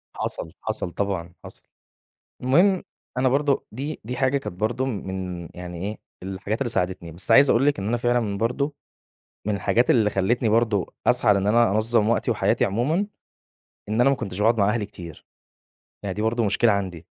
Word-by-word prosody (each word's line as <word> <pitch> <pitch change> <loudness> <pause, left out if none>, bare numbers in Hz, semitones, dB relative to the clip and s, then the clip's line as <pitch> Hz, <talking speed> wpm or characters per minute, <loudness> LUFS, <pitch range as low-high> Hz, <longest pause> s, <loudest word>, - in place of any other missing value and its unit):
حصل 80 - -3
حصل 85 - -2
طبعًا 95 -4 -3
حصل، - - -12 0.8
المهم 175 +9 +4 0.4
أنا 130 0 +3
برضو 140 +1 +1
دي 145 +4 -5
دي 125 +2 -4
حاجة 135 +1 +2
كانت 90 -10 -7
برضو 120 +4 0
م 110 -8 -4
من 90 -3 -5
يعني 90 -1 -7
إيه، 105 +1 -5 0.2
الحاجات 95 +3 -3
اللي 130 - 0
ساعدتني 90 -4 -2
بس 85 +2 -1
عايز 140 0 +7
أقول 135 +5 +3
لِك 145 - +2
إن 100 +2 -3
أنا 120 - +1
فعلًا 120 -4 0
برضو، 140 +6 -1 0.7
من 105 - +1
الحاجات 115 +5 +2
اللي 110 -4 +4
خلتني 110 +4 +1
برضو 110 -4 +1
أسعى 120 -4 +4
لإن 100 0 0
أنا 115 0 +4
أنظم 110 +1 +2
وقتي 115 - +1
وحياتي - - +2
عمومًا، 150 - 0 0.8
إن 110 +3 +1
أنا 135 - +5
ما 135 - +3
كنتش 95 -5 -6
باقعد 115 +2 +3
مع 100 +1 +4
أهلي 105 -2 0
كتير، 85 -6 -11 0.8
أهي 95 - -2
دي 105 - -3
برضو 115 +1 +1
مشكلة 110 +3 +3
عندي. 95 -4 -3
110 Hz, 180 wpm, -24 LUFS, 95-125 Hz, 0.8 s, عايز